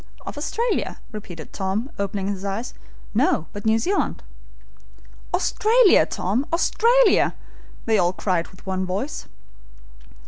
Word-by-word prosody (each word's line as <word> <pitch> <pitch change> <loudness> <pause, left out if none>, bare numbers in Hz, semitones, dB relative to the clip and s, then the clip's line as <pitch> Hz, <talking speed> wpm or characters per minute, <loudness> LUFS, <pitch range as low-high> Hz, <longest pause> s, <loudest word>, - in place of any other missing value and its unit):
"Of - - -6
Australia?" 445 +11 -1
repeated 175 -7 -9
Tom, 200 +7 -2
opening 200 -1 -2
his 200 -1 -3
eyes. 200 +5 -3 0.4
"No, 160 - +2
but 205 +1 -4
New 220 0 +4
Zealand." 380 - -1 1.1
"Australia, 450 -1 +4
Tom! 210 +9 -1
Australia!" 460 +6 +4 0.5
they 220 -2 +3
all 175 -1 +3
cried 180 -2 -1
with 185 - -18
one 190 -1 -1
voice. 195 +10 -3
210 Hz, 115 wpm, -23 LUFS, -, 1.1 s, New